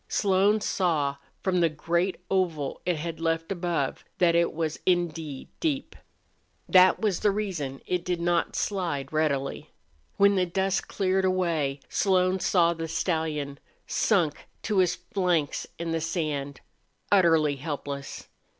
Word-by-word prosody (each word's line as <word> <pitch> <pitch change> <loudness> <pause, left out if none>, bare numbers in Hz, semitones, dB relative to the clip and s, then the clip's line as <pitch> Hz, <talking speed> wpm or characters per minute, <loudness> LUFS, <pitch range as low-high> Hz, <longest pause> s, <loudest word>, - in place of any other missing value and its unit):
Slone 200 +2 +2
saw, 155 -9 0 0.3
from 185 -2 +1
the 170 -1 +4
great 170 +4 -1
oval 185 -4 +2
hole 135 - -6
it 180 - +2
had 160 +1 -5
left 165 +1 -1
above, 170 -7 -2
that 175 -2 +4
it 170 0 +3
was 160 -1 -3
indeed 165 -6 -1
deep. 290 -4 -2 0.7
That 185 0 +6
was 205 -5 0
the 210 - +3
reason 180 -10 -3
it 180 -1 -1
did 180 -1 -1
not 170 0 0
slide 165 -9 -2
readily. 140 -3 -1 0.5
When 200 0 +5
the 185 -2 +1
dust 190 +2 0
cleared 190 -1 0
away 165 -7 0
Slone 185 -1 +2
saw 170 -2 +3
the 165 -1 -5
stallion, 155 -4 -2 0.3
sunk 175 -9 +1 0.2
to 210 -3 +1
his 175 -1 +3
flanks 175 -4 -1
in 170 -1 -3
the 165 0 -1
sand, 150 -4 -3 0.5
utterly 165 -7 +4
helpless. 140 -1 -6
170 Hz, 140 wpm, -27 LUFS, 155-185 Hz, 0.7 s, That